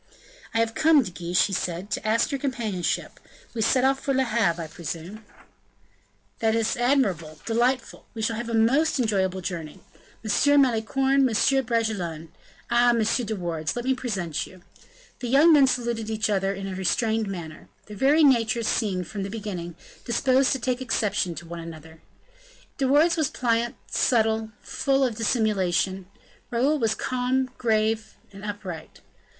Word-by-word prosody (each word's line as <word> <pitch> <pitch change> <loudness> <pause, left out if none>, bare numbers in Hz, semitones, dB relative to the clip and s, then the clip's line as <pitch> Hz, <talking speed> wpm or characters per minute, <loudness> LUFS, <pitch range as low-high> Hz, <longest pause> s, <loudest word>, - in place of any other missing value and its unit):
"I 225 - -2
have 225 0 +1
come, 315 -1 +4
De 185 - -7
Guiche," 175 0 +1
he 200 - -4
said, 180 +2 -3
"to 215 - -2
ask 230 +5 +2
your 275 - -2
companionship. 225 -10 -2 0.3
We 230 - -3
set 250 +3 +3
off 270 0 +3
for 275 -1 -1
Le 265 - +3
Havre, 215 -8 0
I - - -5
presume." 170 +6 -7 1.2
"This 225 0 +1
is - - 0
admirable 200 - +1
delightful. 245 +3 -1
We 220 - -4
shall 225 +1 0
have 235 +1 -5
a 230 - -1
most 270 +8 +3
enjoyable 190 -5 0
journey. 165 -4 -6 0.5
M. 285 +7 +4
Malicorne, 265 +3 +2
M. 265 +4 +2
Bragelonne 190 -9 -2 0.4
ah! 240 +1 +5
M. 235 -1 +3
de 220 0 0
Wardes, 165 -4 -3
let 240 0 -4
me 265 - +3
present 195 - -3
you." 185 -1 -16 0.6
The 245 - -4
young 290 +7 +6
men 280 -3 +6
saluted 235 -3 -1
each 215 -1 -1
other 195 -1 +1
in 195 0 -5
a 190 - -5
restrained 220 +4 0
manner. 170 -5 -7 0.2
Their 210 - -10
very 285 +8 +4
natures 235 -4 +3
seemed, 185 -5 0
from 205 -2 -5
the 195 - -4
beginning, 190 -6 -6 0.3
disposed 260 +2 +2
to 265 - -2
take 250 +1 -1
exception 205 -7 -1
to 170 - -8
each 165 0 -7
other. 160 +1 -15 0.8
De 270 - +2
Wardes 310 +6 +4
was 310 -4 +1
pliant, 235 -1 0
subtle, 220 -2 +1
full 275 -1 0
of 240 -4 -1
dissimulation; 195 -5 0 0.4
Raoul 270 +6 +1
was 220 -2 +1
calm, 255 +1 -1
grave, 220 -1 0 0.2
and 195 0 -11
upright. 195 -6 -7
225 Hz, 165 wpm, -25 LUFS, 190-255 Hz, 1.2 s, young